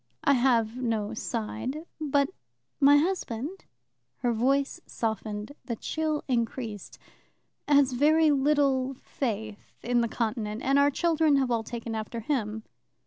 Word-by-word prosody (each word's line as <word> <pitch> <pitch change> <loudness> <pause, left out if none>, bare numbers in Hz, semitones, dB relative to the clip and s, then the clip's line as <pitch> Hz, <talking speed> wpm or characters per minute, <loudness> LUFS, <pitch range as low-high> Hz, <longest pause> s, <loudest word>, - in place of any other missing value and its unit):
"I 280 - +5
have 240 -3 +2
no 225 -4 -1
side. 245 +7 -4
But 285 -2 +1 0.5
my 285 0 +7
husband" 320 -1 -2 0.6
her 240 -1 +2
voice 270 +5 +1
softened, 215 0 -3
the 235 - -3
chill 310 +5 -2
increased 230 -4 -3 0.7
"has 285 -2 +4
very 305 +4 +4
little 275 -2 +2
faith 220 -5 -5
in 240 0 +2
the 235 - +1
Continent, 225 -1 -3
and 275 +1 +3
our 285 0 +5
children 320 0 +2
have 265 -3 +1
all 230 -1 +2
taken 230 0 -6
after 220 +1 -4
him." 220 -4 -2
255 Hz, 130 wpm, -28 LUFS, 225-285 Hz, 0.7 s, my